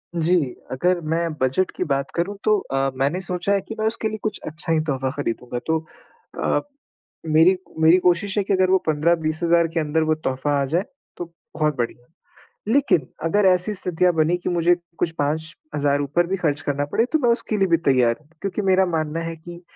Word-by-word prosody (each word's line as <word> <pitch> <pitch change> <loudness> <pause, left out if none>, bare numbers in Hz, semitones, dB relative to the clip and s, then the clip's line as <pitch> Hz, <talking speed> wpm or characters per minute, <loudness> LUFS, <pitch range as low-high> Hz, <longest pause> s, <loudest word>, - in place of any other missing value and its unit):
जी, 170 +2 +2 0.4
अगर 175 +7 +1
मैं 170 +1 +1
बजट 130 +9 +1
की - - -1
बात 140 0 -1
करूँ, 185 +4 -1
तो 215 -1 +4
अ, 135 -5 -1
मैंने 140 +7 0
सोचा 180 +1 -2
है 200 - +1
कि 225 - -8
मैं 220 - +1
उसके 225 0 -2
लिए 215 - -5
कुछ 215 -2 -2
अच्छा 155 +1 -4
ही 160 - +3
तोहफ़ा 135 -4 -1
खरीदूँगा। 125 -3 -3
तो 160 - +2 0.7
अ, - - +1 0.7
मेरी 160 +4 +5 0.2
मेरी 160 +3 +6
कोशिश 180 +3 +2
है 200 - +3
कि 200 - -1
अगर 185 -1 +3
वो 190 - +6
15-20 155 +1 +1
हज़ार 170 0 +4
के 165 - +1
अंदर 155 +1 0
वो 155 0 +1
तोहफ़ा 135 -1 -2
आ - - +1
जाए, 170 +9 0 0.3
तो 175 - -4 0.3
बहुत 150 -2 +1
बढ़िया। 120 0 -3 0.7
लेकिन 275 - +2 0.2
अगर 205 +4 +2
ऐसी 185 +2 +3
स्थितियाँ 180 -1 +1
बनी 160 +2 +2
कि 175 - -4
मुझे 175 0 +3 0.2
कुछ 165 - +1
5 155 +2 -1 0.2
हज़ार 145 -1 +1
ऊपर 155 +5 +1
भी 190 +2 -1
खर्च 155 -5 0
करना 145 0 -1
पड़े, 230 - +3
तो 315 - +1
मैं 245 - +1
उसके 230 -2 0
लिए 195 - +3
भी 170 - +4
तैयार 120 -3 +3
हूँ, 150 - -27
क्योंकि 200 +1 -3
मेरा 190 0 +3
मानना 160 -1 -2
है 165 0 -5
कि 175 +2 -11
165 Hz, 205 wpm, -22 LUFS, 150-185 Hz, 0.7 s, मेरी